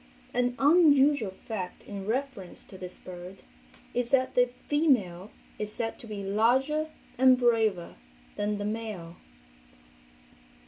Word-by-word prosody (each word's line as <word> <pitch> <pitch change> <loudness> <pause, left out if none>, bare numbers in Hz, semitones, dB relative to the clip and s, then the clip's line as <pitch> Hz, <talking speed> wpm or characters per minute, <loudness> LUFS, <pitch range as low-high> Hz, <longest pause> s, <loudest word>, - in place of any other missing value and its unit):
An 245 0 +1
unusual 285 - +5 0.2
fact 190 -5 -5
in 200 -1 -7
reference 240 -6 -3
to - - -13
this 180 -1 -7
bird 180 +1 -10 0.5
is 245 -1 -1
that 260 -1 +2
the 245 0 +4 0.2
female 220 - +1 0.3
is 210 0 -2
said 225 +1 -3
to 235 - -6
be 205 -2 -5
larger 260 +10 +2 0.3
and 260 -1 +7
braver 225 - +1 0.4
than 205 0 -1
the 205 - -3
male. 210 -6 -5
225 Hz, 125 wpm, -28 LUFS, 195-260 Hz, 0.5 s, and